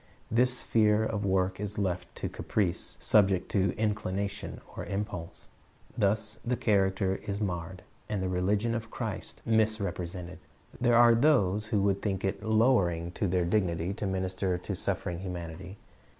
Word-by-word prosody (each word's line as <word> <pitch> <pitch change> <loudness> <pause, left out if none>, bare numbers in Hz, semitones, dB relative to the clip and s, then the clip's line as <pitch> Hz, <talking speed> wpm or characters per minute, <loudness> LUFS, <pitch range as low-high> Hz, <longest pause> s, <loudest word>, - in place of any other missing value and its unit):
This 125 +2 +3
sphere 110 -2 +3
of 105 -2 -2
work 95 0 +1
is 105 0 -4
left 90 -3 -2
to - - -3
caprice, 95 -5 -2
subject 95 -3 +3
to 95 -2 +2
inclination 100 -2 -2 0.2
or - - -4
impulse. 100 -4 -5 0.5
Thus 105 0 +1
the 125 0 0
character 95 -2 +1
is 100 0 -2
marred, 90 -2 -4 0.3
and 105 - -1
the 95 - -1
religion 100 +5 +1
of 115 -1 -4
Christ - - -5
misrepresented. 100 -5 -1 0.4
There 120 -1 +4
are 120 -1 +7
those 110 -6 +3
who 105 -4 +1
would 100 -1 +1
think 95 -2 -1
it 95 +1 -2
lowering 110 -7 +2
to 100 - -1
their 90 -1 +1
dignity 85 -1 0
to 105 -1 -3
minister 95 -1 -1
to 90 - -5
suffering 85 -1 -2
humanity. 90 +1 -6
100 Hz, 150 wpm, -29 LUFS, 90-110 Hz, 0.5 s, are